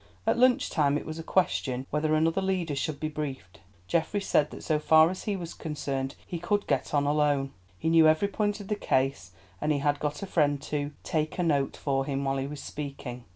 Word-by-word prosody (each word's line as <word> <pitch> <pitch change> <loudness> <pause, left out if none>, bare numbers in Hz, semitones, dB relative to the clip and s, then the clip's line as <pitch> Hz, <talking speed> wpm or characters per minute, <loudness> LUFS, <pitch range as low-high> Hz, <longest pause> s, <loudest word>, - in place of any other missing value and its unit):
At - - +3
lunch 255 0 +4
time 145 -2 +2
it - - -6
was 155 +1 -6
a - - -5
question 135 -8 0
whether 155 +1 +1
another 165 +4 +2
leader 185 -6 -1
should 140 +1 -2
be 155 - -1
briefed. 145 -11 -6 0.3
Geoffrey 170 +5 0
said 150 -6 +2
that - - -10
so 155 -2 +1
far 160 +2 +6
as 185 - -7
he 205 - 0
was 175 -3 -6
concerned 140 -3 -3
he 170 - -5
could 205 +4 0
get - - 0
on 145 -1 +2
alone. 145 -2 +2 0.3
He 160 - -3
knew 165 -1 +6
every 155 +6 +4
point 205 0 -1
of 200 - -8
the 210 - 0
case, 130 - 0 0.3
and 150 - +1
he 150 - +2
had 145 +1 +1
got 150 +3 -3
a - - -1
friend 145 -6 +2
to 145 -1 -2
"take 155 -3 -1
a 180 - +1
note" 145 -5 +1
for 135 -2 0
him 140 0 -2
while 135 0 0
he 135 0 -2
was 145 -1 -7
speaking. 135 -4 -6
150 Hz, 225 wpm, -28 LUFS, 140-165 Hz, 0.3 s, far